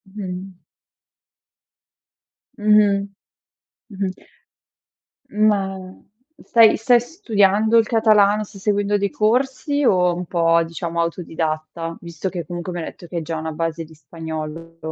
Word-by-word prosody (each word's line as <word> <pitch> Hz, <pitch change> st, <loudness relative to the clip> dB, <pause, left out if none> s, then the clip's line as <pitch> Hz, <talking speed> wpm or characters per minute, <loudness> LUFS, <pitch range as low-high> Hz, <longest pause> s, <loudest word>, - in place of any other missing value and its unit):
Mh-mh. 185 Hz, -2 st, -6 dB, 2.0 s
Mh, 210 Hz, -2 st, +3 dB, 0.8 s
mh-mh. 195 Hz, -1 st, -3 dB, 1.1 s
Ma 195 Hz, -3 st, 0 dB, 0.5 s
stai 225 Hz, -2 st, +5 dB
stai 240 Hz, +1 st, +4 dB
studiando 220 Hz, -, +2 dB
il 225 Hz, -, +5 dB
catalano, 215 Hz, -2 st, +4 dB
stai 195 Hz, -1 st, -14 dB
seguendo 205 Hz, 0 st, +1 dB
dei 200 Hz, 0 st, -1 dB
corsi, 265 Hz, +7 st, 0 dB
o 180 Hz, -6 st, +4 dB
è -, -, -1 dB
un 180 Hz, +1 st, -5 dB
po' 165 Hz, -1 st, +2 dB
diciamo 170 Hz, 0 st, -3 dB
autodidatta? 165 Hz, -1 st, -3 dB
Visto 170 Hz, +2 st, -5 dB
che 175 Hz, -3 st, -5 dB
comunque 175 Hz, +1 st, -5 dB
mi 175 Hz, -, -4 dB
hai 160 Hz, -, -4 dB
detto 175 Hz, -, -10 dB
che 175 Hz, -, -6 dB
hai -, -, -1 dB
già 165 Hz, +1 st, -4 dB
una 160 Hz, 0 st, -4 dB
base 165 Hz, +1 st, -3 dB
di 160 Hz, 0 st, -15 dB
spagnolo. 160 Hz, +1 st, -7 dB
185 Hz, 130 wpm, -21 LUFS, 165-210 Hz, 2.0 s, stai